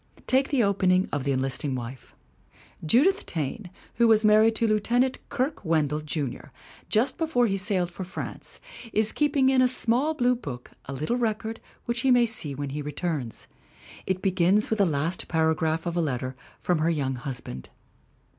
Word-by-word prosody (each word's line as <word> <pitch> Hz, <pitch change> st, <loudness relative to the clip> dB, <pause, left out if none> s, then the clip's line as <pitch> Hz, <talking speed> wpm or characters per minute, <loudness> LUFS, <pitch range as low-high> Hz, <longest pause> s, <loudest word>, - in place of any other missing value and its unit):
Take 265 Hz, +1 st, +2 dB
the 270 Hz, -5 st, +2 dB
opening 190 Hz, -2 st, +2 dB
of 145 Hz, -2 st, -2 dB
The 140 Hz, -, +1 dB
Enlisting 135 Hz, +1 st, -1 dB
Wife: 125 Hz, +1 st, -8 dB, 0.7 s
"Judith 290 Hz, -, +3 dB
Taine, 170 Hz, +5 st, -4 dB, 0.3 s
who 235 Hz, 0 st, +5 dB
was 220 Hz, -1 st, +4 dB
married 215 Hz, +1 st, +5 dB
to 230 Hz, -, +2 dB
Lieutenant 240 Hz, +5 st, +1 dB
Kirke 270 Hz, +1 st, -2 dB
Wendell, 155 Hz, -3 st, +1 dB
Junior, 150 Hz, -4 st, -4 dB, 0.4 s
just 225 Hz, +5 st, +1 dB
before 315 Hz, -7 st, +2 dB
he 195 Hz, -4 st, 0 dB
sailed 190 Hz, -3 st, 0 dB
for 185 Hz, -, -6 dB
France, 185 Hz, -, -7 dB, 0.3 s
is 215 Hz, 0 st, +3 dB
keeping 290 Hz, -3 st, +2 dB
in 265 Hz, -1 st, +4 dB
a 255 Hz, -, +5 dB
small 255 Hz, +5 st, +1 dB
blue 250 Hz, -2 st, +2 dB
book 130 Hz, -, -8 dB
a 135 Hz, -, -6 dB
little 155 Hz, -, -1 dB
record 225 Hz, -1 st, -2 dB, 0.3 s
which 235 Hz, 0 st, -1 dB
he 265 Hz, -, +1 dB
may 245 Hz, -1 st, +5 dB
see 165 Hz, -, 0 dB
when 140 Hz, 0 st, -4 dB
he 150 Hz, +2 st, -4 dB
returns. 145 Hz, -4 st, -4 dB, 0.6 s
It 190 Hz, 0 st, -1 dB
begins 190 Hz, +3 st, +2 dB
with 220 Hz, -, 0 dB
the 200 Hz, -, +4 dB
last 160 Hz, +4 st, -1 dB
paragraph 160 Hz, 0 st, +1 dB
of 170 Hz, -1 st, -2 dB
a 175 Hz, -, +1 dB
letter 130 Hz, -4 st, -2 dB, 0.2 s
from 175 Hz, -3 st, 0 dB
her 160 Hz, +2 st, +2 dB
young 140 Hz, -5 st, -1 dB
husband. 125 Hz, -, -7 dB
185 Hz, 175 wpm, -26 LUFS, 150-235 Hz, 0.7 s, who